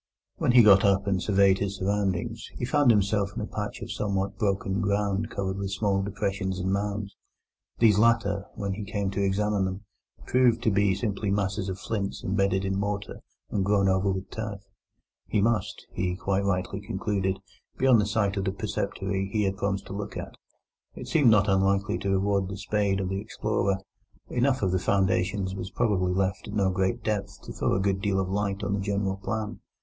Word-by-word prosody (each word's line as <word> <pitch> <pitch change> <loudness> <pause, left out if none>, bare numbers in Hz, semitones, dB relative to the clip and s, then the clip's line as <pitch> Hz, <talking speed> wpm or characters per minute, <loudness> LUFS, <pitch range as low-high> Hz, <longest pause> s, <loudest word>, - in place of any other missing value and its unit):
When - - +2
he 125 -2 +8
got 100 -2 +7
up 100 -1 +3
and 95 -2 0
surveyed 100 -2 +4
his 100 0 -2
surroundings, 100 +3 -1
he 120 - -3
found 145 0 +3
himself 100 -2 +3
in - - -3
a - - -2
patch - - -5
of - - -6
somewhat 100 -1 -1
broken 100 -1 0
ground 100 +1 0
covered 95 -2 -3
with 100 0 -3
small 100 -1 +1
depressions 95 -1 -2
and 95 +1 -1
mounds. 100 0 -2 0.6
These 105 -3 +5
latter, 105 -3 +2
when 100 -1 -2
he 105 +2 -5
came 100 -1 -2
to 100 0 -1
examine 100 0 +1
them, 95 +1 -4 0.4
proved 125 -2 +3
to 110 - +3
be 100 -1 +3
simply 100 0 -2
masses 100 0 -1
of 95 - -3
flints 100 -1 -3
embedded 95 0 +1
in 95 0 -1
mortar 100 0 -3 0.3
and 100 - 0
grown 100 0 +3
over 95 +1 +2
with 95 +1 -5
turf. 105 -3 -5 0.7
He 105 - +1
must, 105 -2 0
he 90 -1 -1
quite 95 +1 -1
rightly 100 +1 -1
concluded, 100 -2 -1 0.4
be 130 - 0
on 125 -4 +6
the 105 - +1
site 100 -1 0
of 100 - -1
the 95 - +1
preceptory 95 0 -3
he 105 0 +1
had 95 -1 0
promised 100 -1 -2
to - - -8
look 100 +1 -5
at. - - -6 0.6
It - - -8
seemed 145 -7 +5
not 105 -2 +5
unlikely 95 0 +2
to 100 - -2
reward 95 0 +1
the 100 - -5
spade 100 -1 0
of 95 -1 -2
the 95 +1 -2
explorer; 100 -2 -1 0.5
enough 130 0 +1
of 95 - +2
the 95 - +1
foundations 95 0 +1
was 95 -1 -5
probably 100 -7 +1
left 95 0 -1
at 105 - -6
no 95 -2 +2
great 95 +5 -1
depth 105 -2 -3
to - - -8
throw - - 0
a - - +1
good 95 0 0
deal 95 -1 +1
of 95 -1 -1
light 100 0 -1
on 100 0 -1
the 100 - 0
general 100 -1 -1
plan. 105 +2 -4
100 Hz, 200 wpm, -27 LUFS, 95-105 Hz, 0.7 s, he